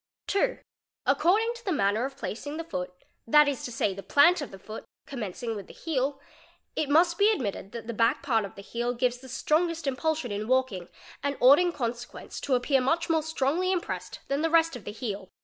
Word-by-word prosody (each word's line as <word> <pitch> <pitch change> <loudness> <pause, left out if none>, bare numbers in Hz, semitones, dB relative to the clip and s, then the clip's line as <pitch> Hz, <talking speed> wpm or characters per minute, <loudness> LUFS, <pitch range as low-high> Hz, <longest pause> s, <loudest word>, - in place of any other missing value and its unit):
| - - -67
2. 455 +5 +1 0.5
According 380 +11 +3
to 475 0 -12
the 390 - -1
manner 215 - +1
of 270 0 -7
placing 290 +7 -5
the 330 - -3
foot, 180 - -4 0.4
that 300 +5 +6
is 280 -4 -2
to 245 - -5
say, 210 -3 0
_ - - -12
the 195 - -7
plant 300 - +5
of 290 - -5
the 195 - -10
foot, 215 +3 -9 0.2
commencing 230 -2 -4
with 200 -2 -7
the - - -12
heel, 275 -3 -1 0.6
it 295 - -1
must 340 +3 +4
be 410 +1 +6
admitted 205 - -2
that 235 -1 -7
the 235 - -4
back 230 +1 +2
part 225 -5 +2
of 200 - -8
the 200 - -10
heel 240 +3 -2
gives 245 0 0
the 260 0 -12
strongest 320 +5 0
impulsion 275 -1 -1
in 205 +1 -3
walking 250 -9 0 0.3
and 280 0 -2
ought 270 +5 +8
in 355 0 +2
consequence 240 -4 -5
to 270 - +1
appear 260 +2 +2
much 330 +6 +1
more 320 -1 +3
strongly 320 +4 0
impressed 365 -3 -3
than 275 +2 0
the 325 - +1
rest 330 -2 +3
of 240 - -9
the - - -4
heel. 205 -4 -5
270 Hz, 220 wpm, -28 LUFS, 230-320 Hz, 0.6 s, ought